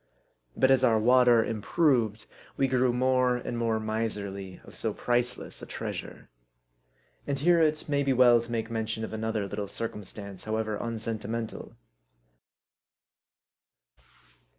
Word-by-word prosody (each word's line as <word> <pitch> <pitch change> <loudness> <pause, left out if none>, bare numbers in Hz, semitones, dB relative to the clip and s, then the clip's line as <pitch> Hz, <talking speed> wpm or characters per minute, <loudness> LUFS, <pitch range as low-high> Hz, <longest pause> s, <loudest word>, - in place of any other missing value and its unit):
But 130 - +4
as 130 -1 +4
our 115 -3 +4
water 120 0 +5
improved, 115 -1 +1 0.3
we 135 - +3
grew 130 -1 +2
more 125 0 +2
and 120 - -5
more 115 -1 0
miserly 105 -4 -3
of - - -14
so - - -2
priceless 120 0 -1
a - - -8
treasure. - - -6 1.0
And 140 -1 -1
here 170 +4 +4
it 155 -1 +1
may 145 -1 +1
be 140 -1 +1
well 120 -2 +6
to 120 0 -9
make 115 -1 -2
mention 110 -1 -2
of 110 - -5
another 110 -1 -2
little 100 +1 -4
circumstance, 100 -3 -6
however 110 0 -1
unsentimental. 115 0 -5
115 Hz, 130 wpm, -28 LUFS, 110-125 Hz, 1.0 s, well